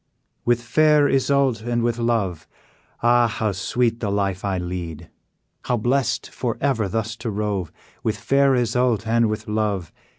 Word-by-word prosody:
"With 120 0 +2
fair 150 +3 +4
Isoude, 135 -3 +2
and 120 0 -1
with 120 0 0
love, 110 -8 -1 0.6
Ah! 120 0 +5
how 110 -1 -1
sweet 115 +5 0
the 105 - -2
life 100 -2 -1
I 100 -2 -1
lead! 85 -3 -5 0.5
How 125 - +1
blest 125 +4 0
for 120 -3 -3
ever 130 -7 +1
thus 110 +3 -2
to 115 - -4
rove, 100 -5 -2 0.3
With - - -1
fair 140 -1 +3
Isoude, 120 -2 +1
and 115 0 +2
with 110 +1 -4
love! 105 -5 -1
115 Hz, 155 wpm, -22 LUFS, 100-120 Hz, 0.6 s, Ah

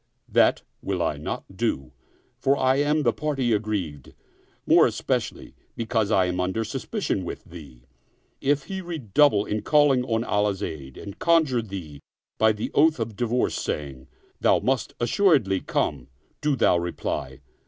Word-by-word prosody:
That - - +3 0.2
will - - -2
I - - 0
not - - -4
do, 65 -2 -2 0.5
for 140 +1 +2
I 130 +1 +3
am 150 +2 +2
the 120 -3 +2
party 135 -6 0
aggrieved, 100 -10 -3 0.5
more - - +6
especially - - -3 0.2
because 110 -2 0
I 95 -4 +3
am 90 0 -2
under 95 +5 0
suspicion 130 - -3
with 85 - -6
thee. 70 -8 -13 0.6
If 140 0 +1
he 190 +3 -5
redouble 145 - +2
in 105 0 -2
calling 145 -4 +4
on 115 -2 0
Allah's 105 -2 0
aid 70 -4 -6
and 100 0 -9
conjure 160 -8 +3
thee 90 -9 -8 0.4
by 110 0 +5
the 105 0 -4
oath 155 -1 +4
of 115 -2 -3
divorce 120 +3 0
saying, 70 -3 -4 0.3
Thou - - +4
must 125 -3 -1
assuredly 120 - +3
come, 65 -7 -2 0.3
do 150 -1 +1
thou 90 -8 +3
reply. 70 -6 -4
110 Hz, 150 wpm, -25 LUFS, 90-135 Hz, 0.6 s, more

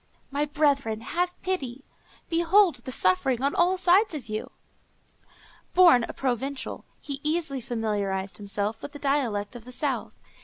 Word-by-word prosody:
My 285 +2 0
brethren, 280 -7 +1
have 355 +8 -2
pity! 275 -8 -3 0.4
behold 345 +1 +4
the 245 +2 -7
suffering 235 +5 +2
on 280 - +2
all 360 +2 +3
sides 370 +1 +4
of 250 -7 -7
you!" 215 0 -4 1.3
Born 340 -10 +7
a - - -6
Provençal, 270 +1 -3
he 280 -1 -6
easily 305 -3 -1
familiarized 205 -5 -2
himself 205 +1 -3
with 285 - -8
the - - -7
dialect 255 -7 -1
of 240 - -9
the 250 - -11
south. 275 +2 -2
275 Hz, 145 wpm, -26 LUFS, 225-320 Hz, 1.3 s, Born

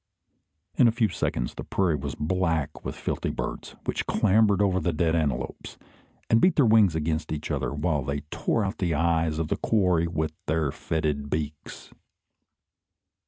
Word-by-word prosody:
In 125 - +6
a - - +4
few 115 -2 +1
seconds 60 -8 -2
the - - -7
prairie 90 -5 +1
was 70 0 -4
black 80 -2 -1
with - - -5
filthy - - -3
birds, - - -5
which - - -2
clambered 105 -1 +3
over 95 -2 +2
the 90 - 0
dead 80 +1 +1
antelopes, 75 -6 -2 0.5
and 115 0 +4
beat 185 - +4
their 140 - +4
wings 110 -6 +5
against 80 0 -2
each 75 -1 -4
other, - - -1
while 75 0 0
they 70 +2 -3
tore 110 - 0
out 95 +3 -4
the 85 -4 0
eyes 80 0 +1
of 80 -1 -2
the - - 0
quarry 90 -6 +2
with 80 -2 -2
their 80 -2 +1
fetid 75 -2 -2
beaks. 75 0 -5
80 Hz, 165 wpm, -26 LUFS, 75-95 Hz, 0.5 s, In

